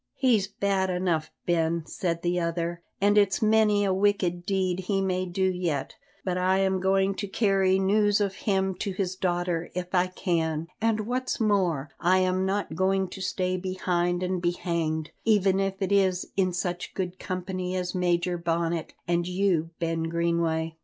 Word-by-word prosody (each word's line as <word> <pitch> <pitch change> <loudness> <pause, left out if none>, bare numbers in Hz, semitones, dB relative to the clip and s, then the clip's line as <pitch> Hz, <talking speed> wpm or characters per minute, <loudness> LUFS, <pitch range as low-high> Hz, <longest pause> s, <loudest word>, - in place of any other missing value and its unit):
"He's 240 -7 +2
bad 195 -1 0
enough, 180 -3 0 0.2
Ben," 165 -1 +1
said 170 -1 -3
the 175 0 +1
other, 170 0 -2 0.2
"and 205 +1 +4
it's 200 -2 +2
many 215 -1 +3
a 190 - +2
wicked 185 -3 +1
deed 185 -2 0
he 195 +1 -1
may 185 -1 0
do 180 +2 -2
yet, 180 -7 -1 0.3
but 180 -1 0
I 185 +1 +2
am 190 -1 +1
going 190 +1 +2
to 200 +1 -4
carry 195 -2 +2
news 205 +2 +3
of 200 -2 0
him 190 -1 0
to 200 -3 -2
his 185 -1 -2
daughter 175 -2 -1
if 180 0 -4
I 180 0 +3
can; 165 -4 -1 0.2
and 225 -1 +2
what's 255 +4 -2
more, 180 - +1
I 185 +2 +3
am 185 0 +1
not 195 -3 -1
going 190 +2 +1
to 190 - -8
stay 185 0 -1
behind 180 -1 -1
and 180 -1 -1
be 175 0 +1
hanged, 160 -3 -2
even 195 -3 +3
if 195 0 -1
it 190 - -2
is 190 -2 +2
in 185 -2 +2
such 180 0 -3
good 185 -1 -3
company 185 0 -3
as 180 -1 -2
Major 175 -1 0
Bonnet 170 -1 -1
and 175 0 +1
you, 180 -3 +1
Ben 165 -1 -1
Greenway." 165 -1 0
185 Hz, 175 wpm, -27 LUFS, 175-195 Hz, 0.3 s, and